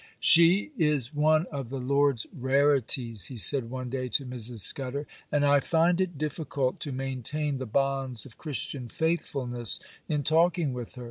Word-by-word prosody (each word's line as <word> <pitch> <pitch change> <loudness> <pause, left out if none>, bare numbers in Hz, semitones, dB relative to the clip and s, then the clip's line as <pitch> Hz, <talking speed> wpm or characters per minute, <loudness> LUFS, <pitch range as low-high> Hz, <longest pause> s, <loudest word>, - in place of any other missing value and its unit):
'She 175 - +5
is 150 -4 +1
one 155 +2 +2
of 135 -5 -6
the 135 - -5
Lord's 140 -1 0
rarities,' 130 -4 +2
he 130 - -8
said 115 +2 +3
one 130 0 -6
day 130 -1 -3
to 135 - 0
Mrs. 120 -3 -1
Scudder, 135 +6 +1 0.3
'and 145 -1 +1
I 145 0 +4
find 170 +4 +1
it 175 -5 -3
difficult 145 -3 -3
to 145 - -6
maintain 135 +2 -1
the 130 - -5
bonds 135 0 -1
of 125 - -13
Christian 140 -4 -4
faithfulness 130 -7 0 0.3
in 150 -2 -1
talking 165 -1 +1
with 125 0 -8
her. - - -10
140 Hz, 160 wpm, -27 LUFS, 125-150 Hz, 0.3 s, She